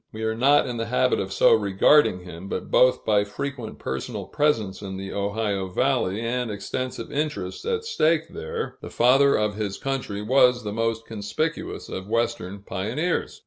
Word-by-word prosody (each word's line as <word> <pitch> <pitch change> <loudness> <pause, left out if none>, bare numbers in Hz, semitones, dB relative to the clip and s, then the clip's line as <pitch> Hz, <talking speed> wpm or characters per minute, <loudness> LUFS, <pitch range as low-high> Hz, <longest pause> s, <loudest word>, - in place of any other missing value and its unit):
We 110 +1 -6
are 110 0 0
not 140 +5 +4
in 125 -3 -4
the 115 0 -2
habit 125 +2 +2
of 95 0 -3
so - - +5
regarding 100 +1 +4
him, 90 +2 -9
but - - -4
both 125 0 +4
by 105 -2 +3
frequent 115 +3 -5
personal 65 0 -4
presence 110 -11 0
in 95 -2 -6
the 95 0 -6
Ohio 100 -1 -1
valley, 95 +2 0
and 120 +1 -1
extensive 115 +4 -4
interests 140 -12 -3
at 455 -1 -1
stake 160 - +2
there, 80 - -5
the - - -7
Father 135 +3 +4
of 105 -1 0
his 100 -3 -3
Country 125 -7 -3
was 125 +1 +4
the 105 -1 -4
most 115 0 -1
conspicuous 110 +10 -3
of 95 +1 -6
Western 100 -4 -1
pioneers. 120 - -2
110 Hz, 170 wpm, -24 LUFS, 100-130 Hz, -, so